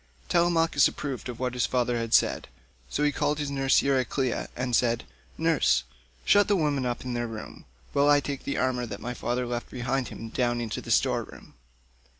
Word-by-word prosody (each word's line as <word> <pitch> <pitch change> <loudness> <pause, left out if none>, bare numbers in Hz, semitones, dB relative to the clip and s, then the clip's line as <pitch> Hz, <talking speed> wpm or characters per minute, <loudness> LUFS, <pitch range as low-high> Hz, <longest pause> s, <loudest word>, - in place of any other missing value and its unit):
Telemachus 165 -4 +3
approved 135 -3 -5
of 120 - -7
what 125 -1 -1
his 125 - +1
father 125 -1 0
had 115 -1 -3
said, - - +2 0.4
so 150 - -1
he 145 - +3
called 145 0 0
nurse 135 -1 +3
Euryclea 135 -1 0
and 125 -1 0
said, 115 0 +2 0.3
"Nurse, 160 - +2 0.4
shut 205 0 +5
the 205 - +3
women 145 -7 0
up 120 +1 -4
in 125 - -3
their 120 0 -2
room, 110 -1 -9 0.3
while 140 +1 +4
I 145 0 +6
take 140 -1 -5
the 140 - -3
armour 125 -1 0
that 100 -2 -6
my 125 +2 -4
father 125 +1 -2
left 120 0 -4
behind 125 +1 -2
him 115 - -8
down 120 0 0
into 115 -2 -3
the - - -10
store - - +3
room. - - -13
125 Hz, 190 wpm, -27 LUFS, 120-145 Hz, 0.4 s, I